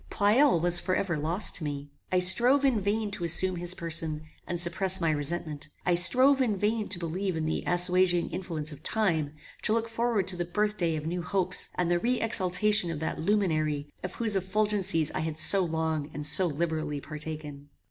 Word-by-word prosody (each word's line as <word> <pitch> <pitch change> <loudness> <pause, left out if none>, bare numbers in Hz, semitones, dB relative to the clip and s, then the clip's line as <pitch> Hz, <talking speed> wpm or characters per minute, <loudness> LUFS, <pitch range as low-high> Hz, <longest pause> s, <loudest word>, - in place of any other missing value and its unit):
Pleyel 215 - +2
was 175 +1 +3
for 185 +1 -2
ever 185 -4 -2
lost 165 +7 +2
to 170 - -7
me. 145 -1 -6 0.2
I 185 - +1
strove 240 +10 +4
in 245 -6 +1
vain 205 +1 -2
to 185 - -7
assume 180 +2 +4
his 175 +1 +2
person, 160 -2 -1 0.2
and 175 - -3
suppress 185 +2 +4
my 165 -2 0
resentment; 155 0 -1 0.2
I 180 - +1
strove 255 +10 +5
in 220 -6 -1
vain 210 +2 -2
to 190 - +2
believe 175 +2 -4
in 160 - -3
the 155 - -3
assuaging 180 0 +3
influence 160 -4 -4
of 145 0 -12
time, 160 -8 -1 0.3
to 215 - +1
look 230 0 -2
forward 230 -4 -2
to 185 - +3
the 175 - -3
birth 210 +4 -2
day 165 -3 -2
of 155 0 -6
new 175 +2 -4
hopes, 185 +2 -1
and 175 -1 -2
the 175 - +1
re 245 +6 -1
exaltation 210 -2 +1
of 165 -3 -5
that 160 - -4
luminary, 155 -6 -2
of 185 - -7
whose 220 -3 +2
effulgencies 195 -4 0
I - - -5
had 160 -1 -5
so 195 +4 +4
long 160 -3 -3
and 150 - -4
so 180 +5 +4
liberally 155 -1 -4
partaken. 150 -1 -9
175 Hz, 200 wpm, -26 LUFS, 160-205 Hz, 0.3 s, strove